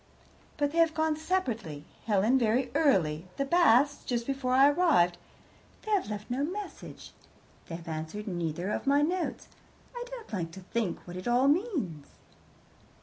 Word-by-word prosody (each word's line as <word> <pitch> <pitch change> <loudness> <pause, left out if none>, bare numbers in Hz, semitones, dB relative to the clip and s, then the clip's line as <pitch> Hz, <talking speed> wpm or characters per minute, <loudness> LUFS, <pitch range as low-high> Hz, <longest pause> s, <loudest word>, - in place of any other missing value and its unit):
"But 290 -1 +1
they 335 - 0
have 330 -1 +4
gone 315 -1 +1
separately 235 - -2 0.2
Helen 220 +5 +3
very 245 +2 +1
early, 180 - +2
the 275 - 0
Basts 285 -3 +4
just 240 -2 -2
before 270 -1 -1
I 270 +2 +7
arrived. 285 - +3 0.6
They 435 - -5
have 395 - +1
left 210 +2 -6
no 265 +3 0
message. 395 +7 -6 0.6
They 165 - -5
have 165 0 -10
answered 160 +6 -5
neither 175 +1 -2
of 275 - -3
my 285 +1 +4
notes. 355 +3 -2 0.5
I 485 - -4
don't 485 - -10
like 170 -5 -2
to 190 - -9
think 200 0 -3
what 175 0 -8
it 185 - -6
all 245 +3 +3
means." 285 - 0
250 Hz, 160 wpm, -29 LUFS, -, 0.6 s, I